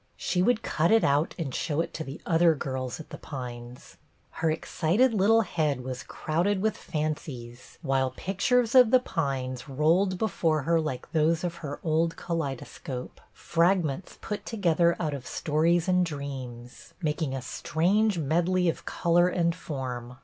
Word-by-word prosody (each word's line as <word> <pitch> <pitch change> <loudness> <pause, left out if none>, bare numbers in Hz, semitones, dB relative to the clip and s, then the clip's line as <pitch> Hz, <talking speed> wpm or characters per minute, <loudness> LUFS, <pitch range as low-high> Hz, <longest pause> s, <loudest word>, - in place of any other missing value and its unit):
She 180 - 0
would 230 +3 +2
cut 160 +2 +1
it 225 0 +5
out 145 +3 +2
and 150 -7 -4
show 155 -2 -1
it 165 - -1
to 160 - -4
the 140 +1 -8
other 165 -1 +4
girls 130 -2 -4
at 160 - -11
The - - -8
Pines. 125 -3 -8 0.3
Her 160 - -1
excited 180 +9 +1
little 220 +3 +4
head 155 - -1
was 130 0 -5
crowded 175 +6 -1
with 215 +2 0
fancies, 150 -7 -5
while 135 -2 +1
pictures 230 +5 +1
of 250 -3 +8
The 255 - +6
Pines 135 - -3
rolled 170 +7 +2
before 165 -7 0
her 165 +1 +2
like 155 -5 -5
those 160 +1 +2
of 170 -1 -3
her 145 -2 -5
old 165 +1 +1
kaleidoscope, 135 -5 -5
— - - -37 0.2
fragments 170 -2 +1
put 210 -1 -4
together 170 -6 +2
out 155 -4 -1
of 135 -3 -6
stories 165 +3 +1
and 180 0 +3
dreams, 130 -6 -7
— - - -36
making 150 -3 -1
a 135 - -4
strange 190 +10 +1
medley 175 +4 +2
of - - -4
color 175 +1 +3
and 170 -2 +1
form. 125 -6 -6
160 Hz, 165 wpm, -27 LUFS, 135-180 Hz, 0.3 s, of